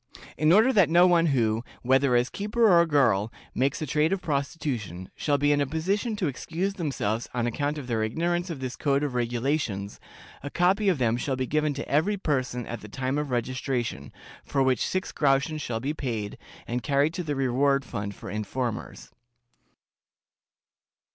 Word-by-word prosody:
In 155 +3 +3
order 220 +8 +5
that 195 -8 +5
no 175 +2 +6
one 170 -2 +4
who, 115 -5 +1 0.2
whether 130 0 +3
as 120 +1 +2
keeper 215 +3 +1
or 175 -4 +6
girl, 115 -8 +2 0.2
makes 135 +2 0
a - - -1
trade 150 +3 +1
of 195 - +1
prostitution, 140 - -3
shall 145 -2 +1
be 145 +1 +2
in 145 0 +3
a 140 - 0
position 195 - -1
to 205 - -1
excuse 170 +7 -2
themselves 130 - -2
on 120 -1 0
account 145 +5 -1
of 145 - -6
their 115 -3 -1
ignorance 175 - -1
of 155 -6 -5
this 130 -1 -4
code 140 0 +1
of 145 -3 -2
regulations, 120 -4 -1 0.4
a 145 - -5
copy 190 +6 +2
of 180 - +2
them 120 -2 +1
shall 135 +2 -1
be 130 0 -1
given 150 +2 0
to 140 - -5
every 170 +9 +1
person 130 - -1
at 120 -1 -6
the 105 - -10
time 130 +5 -2
of 150 -1 -3
registration, 120 - -2 0.3
for 135 - 0
which 130 -3 +2
six 185 0 -2
groschen 145 +2 +1
shall 120 -5 -3
be 140 +6 -2
paid, 115 -9 -4 0.3
and 120 +1 -2
carried 145 +3 +1
to 180 - -3
the 150 -4 -3
reward 135 +1 +2
fund 100 -1 -5
for - - -8
informers." 110 +2 -4
140 Hz, 180 wpm, -26 LUFS, 120-160 Hz, 0.4 s, no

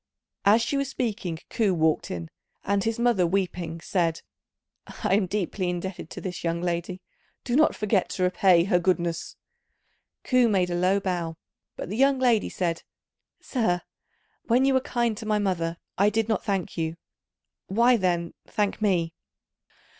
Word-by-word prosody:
As 215 +3 +5
she 275 +4 -1
was 275 -1 -1
speaking 215 -10 -3
Ku 205 -5 +2
walked 160 -1 +1
in; 85 -2 -5 0.4
and 200 0 +1
his 225 0 -1
mother, 235 -7 +3
weeping, 175 -3 -2
said, 165 -2 0 0.6
"I - - -2
am 195 -1 +3
deeply 185 -1 -2
indebted 180 +1 -4
to - - -7
this 180 -2 -5
young 170 0 0
lady; 175 +1 -3 0.4
do 240 - -1
not 310 +2 +4
forget 210 -3 +1
to 185 - -2
repay 180 -1 +4
her 180 -1 +2
goodness." 175 -2 -1 0.9
Ku 250 -2 +3
made 185 -4 +1
a - - 0
low 185 +3 +2
bow, 175 -4 -3 0.4
but - - -6
the 210 - -3
young 275 +1 +4
lady 245 -4 +2
said, 170 -2 -2 0.6
"Sir, 180 -9 0 0.6
when 245 +3 +3
you 270 - +3
were 260 - +3
kind 235 -3 0
to 220 -1 -7
my 215 -1 +2
mother, 170 -5 -1 0.2
I 200 +1 +5
did 220 +1 0
not 220 - 0
thank 195 -5 -2
you; 160 0 -2 0.7
why, 235 +5 +4
then, 175 -5 0
thank 210 0 -1
me?" 175 -6 +1
190 Hz, 160 wpm, -26 LUFS, 175-225 Hz, 0.9 s, As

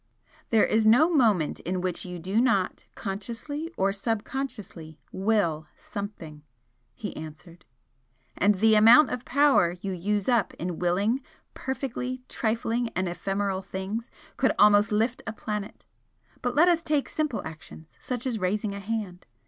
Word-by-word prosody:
"There 220 -2 +4
is 220 0 +2
no 300 +10 +5
moment 215 - +2
in 185 +2 -3
which 180 0 -2
you 180 0 -6
do 190 +7 0
not, 200 -7 +1
consciously 235 - -5
or 195 +1 +2
subconsciously, 210 - -4
'will' 190 -6 0
something" 185 -7 -7 0.5
he 205 - -6
answered 160 +2 -10 0.7
"And 205 +1 +3
the 220 +3 +4
amount 230 +8 +7
of 250 - -4
power 275 -11 +3
you 195 +1 -4
use 200 +3 -1
up 240 -4 +2
in 175 0 -4
'willing' 200 +9 +1 0.3
perfectly 255 -1 -4
trifling 230 +1 -1
and 185 0 0
ephemeral 195 +2 -2
things, 195 +5 -5 0.3
could 260 - +2
almost 210 0 +5
lift 225 +4 0
a 220 - -3
planet! 210 -1 -5 0.6
But 245 0 -2
let 325 +5 +6
us 340 -2 +4
take 300 -4 0
simple 305 -7 -2
actions 160 0 -11
such 250 -1 -4
as 240 -4 -1
raising 205 +2 -1
a 200 - -6
hand. 200 -3 -5
210 Hz, 145 wpm, -27 LUFS, 185-240 Hz, 0.7 s, amount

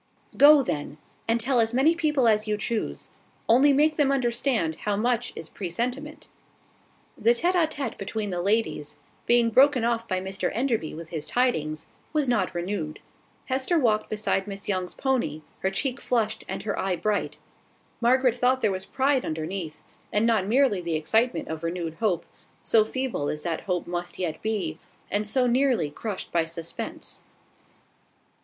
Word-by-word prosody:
"Go, 290 0 +8
then; 145 - -4 0.3
and 230 +1 +2
tell 245 +2 +2
as 225 +1 +2
many 285 +6 +5
people 300 -7 +2
as 215 -1 +3
you 210 0 0
choose: 220 +1 -3 0.4
only 265 +5 +6
make 300 +2 +3
them 285 -3 +3
understand 240 - 0
how 205 -1 -1
much 240 +3 0
is - - -7
presentiment." 245 - -4 0.9
The 235 +1 +3
tete 345 +9 +2
a 345 -3 +3
tete 280 -6 -4
between 205 +1 -3
the 175 -1 -2
ladies, 195 -7 0 0.3
being 235 -1 +4
broken 265 0 +5
off 230 -1 0
by 185 -1 0
Mr 190 +1 -3
Enderby 230 - -1
with 165 0 -8
his 160 -3 -4
tidings, 155 -12 0 0.3
was 300 -3 +1
not 205 -7 +1
renewed. 175 -3 -3 0.5
Hester 265 +6 0
walked 225 -7 +2
beside 210 -2 0
Miss 200 0 -6
Young's 185 -3 -2
pony, 250 - -1 0.2
her 190 - 0
cheek 255 +7 -2
flushed, 220 -3 0
and 190 +1 -4
her 205 -1 -2
eye 190 -1 0
bright. 210 +3 -1 0.6
Margaret 250 0 +4
thought 255 +1 +2
there 210 - +2
was 190 0 -4
pride 270 0 +1
underneath, 160 0 -4 0.3
and 210 +2 +2
not 220 -5 +2
merely 245 -4 +3
the 170 -2 -2
excitement 195 +5 +1
of 160 0 -5
renewed 165 -1 -3
hope, 185 -7 0 0.4
so 220 -2 +4
feeble 240 - -2
as 150 - -4
that 170 -2 -2
hope 180 -2 -2
must 175 0 -4
yet 165 -4 -3
be, 185 -8 -2 0.3
and 210 +1 0
so 250 +4 +2
nearly 245 - +2
crushed 205 +4 -5
by 170 -1 +2
suspense. 165 0 -6
220 Hz, 165 wpm, -26 LUFS, 180-255 Hz, 0.9 s, Go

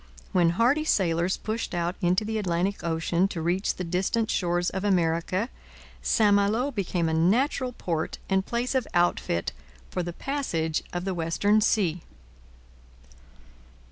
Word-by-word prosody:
When 175 -2 +4
hardy 255 +7 +3
sailors 175 - +1
pushed 220 -3 -3
out 175 +1 -1
into 180 +4 +2
the 220 0 -1
Atlantic 185 +1 -1
ocean 170 +2 +1
to 180 - -5
reach 175 +4 0
the 180 - -4
distant 190 +6 0
shores 175 -1 0
of 190 +1 -3
America, 180 +1 +1 0.5
St 210 -2 +3
Malo 215 +7 +2
became 180 -7 -1
a 160 - 0
natural 250 - +2
port 165 -7 -3
and 190 0 +2
place 240 +4 -2
of 260 -2 0
outfit 175 - +1 0.4
for 180 - -1
the 175 0 -4
passage 165 - -2
of 175 +1 -3
the 190 - -1
western 180 +6 +2
sea. 180 -6 +1
185 Hz, 140 wpm, -26 LUFS, 170-215 Hz, 0.5 s, When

